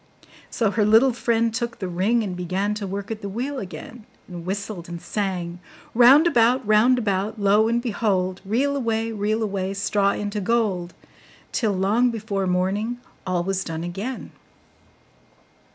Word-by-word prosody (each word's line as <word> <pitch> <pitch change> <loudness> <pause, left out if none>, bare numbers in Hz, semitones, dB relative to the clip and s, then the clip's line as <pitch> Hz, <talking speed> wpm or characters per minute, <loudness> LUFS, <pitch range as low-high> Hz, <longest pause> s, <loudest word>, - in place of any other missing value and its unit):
So 220 -4 0
her 210 0 +1
little 225 +5 +5
friend 230 -1 +1
took 235 0 -3
the 190 - -4
ring, 200 +7 +1
and 190 -4 -4
began 185 +4 -1
to 210 -2 -4
work 200 +2 -5
at 220 -1 -5
the 200 - -5
wheel 260 +7 -3
again, 215 +3 -9 0.2
and 175 -1 -8
whistled 195 -3 -4
and 170 0 -6
sang: 180 -3 -3 0.3
'Round 255 +7 +7
about, 245 -6 +3
round 215 +4 +4
about, 210 -1 -1
Lo 205 +2 +4
and 235 +1 +1
behold! 200 -6 -1
Reel 255 +8 0
away, 225 -3 -1
reel 215 +1 -1
away, 195 -2 -2
Straw 200 0 +1
into 205 0 -3
gold!' 195 -5 0 0.6
till, 220 -4 0
long 205 +6 +2
before 210 -4 -2
morning, 195 +6 0 0.3
all 180 -1 0
was 190 +1 -1
done 165 0 -5
again. 200 +9 -5
210 Hz, 155 wpm, -23 LUFS, 190-230 Hz, 0.6 s, Round